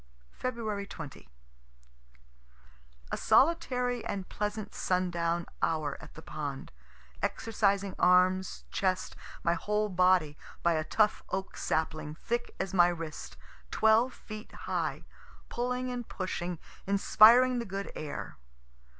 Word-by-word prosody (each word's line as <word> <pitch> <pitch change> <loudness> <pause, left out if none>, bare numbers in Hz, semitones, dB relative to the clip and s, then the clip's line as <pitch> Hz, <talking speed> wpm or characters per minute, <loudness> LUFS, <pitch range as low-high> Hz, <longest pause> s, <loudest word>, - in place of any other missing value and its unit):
Feb. 215 -5 -3
20. 150 -5 -9 1.8
A - - -1
solitary 250 -6 +2
and 195 -2 -4
pleasant 210 0 -3
sundown 175 -2 0 0.2
hour 155 -3 0
at - - -13
the 160 - -10
pond, 145 -3 -5 0.5
exercising 200 -3 0
arms, 185 +1 +3
chest, 185 -1 -1 0.3
my 170 - +3
whole 210 +5 0
body, 180 -5 +3 0.2
by 170 - +4
a 155 -1 0
tough 210 +5 +2
oak 190 0 -3
sapling 155 -1 -2
thick 240 +7 -3
as 190 - -2
my 175 -2 +6
wrist, 165 -3 -5 0.3
twelve 220 +3 +4
feet 215 0 -9
high - - -2 0.5
pulling 250 +1 -2
and 245 -2 -5
pushing, 180 -2 -3 0.3
inspiring 235 +5 +6
the - - -2
good 195 0 -5
air. 150 -2 -6
195 Hz, 115 wpm, -30 LUFS, 170-220 Hz, 1.8 s, my